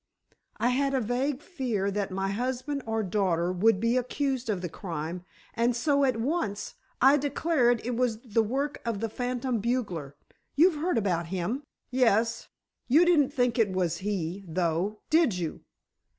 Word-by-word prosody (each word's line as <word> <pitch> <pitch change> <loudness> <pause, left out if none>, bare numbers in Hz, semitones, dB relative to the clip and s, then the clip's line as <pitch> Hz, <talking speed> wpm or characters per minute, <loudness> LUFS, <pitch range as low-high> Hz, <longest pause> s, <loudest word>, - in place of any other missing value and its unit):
"I 240 - +2
had 275 +2 +1
a - - +3
vague 255 +5 -1
fear 235 - -2
that 200 0 -2
my 195 +1 -2
husband 255 +6 -2
or 225 0 0
daughter 180 -3 +1
would 190 +3 +3
be 230 +3 +2
accused 255 -1 -1
of 195 -4 0
the 180 - -2
crime, 170 0 -5 0.3
and 235 +1 +1
so, 280 +3 +2
at 255 -4 +1
once, 230 - -2 0.3
I 270 +3 +6
declared 275 -5 +1
it 245 0 -1
was 235 -3 0
the 225 -2 +1
work 275 +6 -2
of 230 -4 -2
the 225 - -2
phantom 245 0 -2
bugler. 200 - -2 0.4
You've 315 +1 +4
heard 355 -5 +1
about 175 -6 0
him?" 190 +9 -2 0.3
"Yes. 230 -3 +2 0.4
You 310 +8 +5
didn't 315 -6 +4
think 245 -3 +1
it 205 -4 +2
was 175 -3 0
he, 190 -1 -3
though, 175 +5 -1
did 315 - +4
you?" 170 -3 -4
230 Hz, 165 wpm, -28 LUFS, 195-260 Hz, 0.4 s, I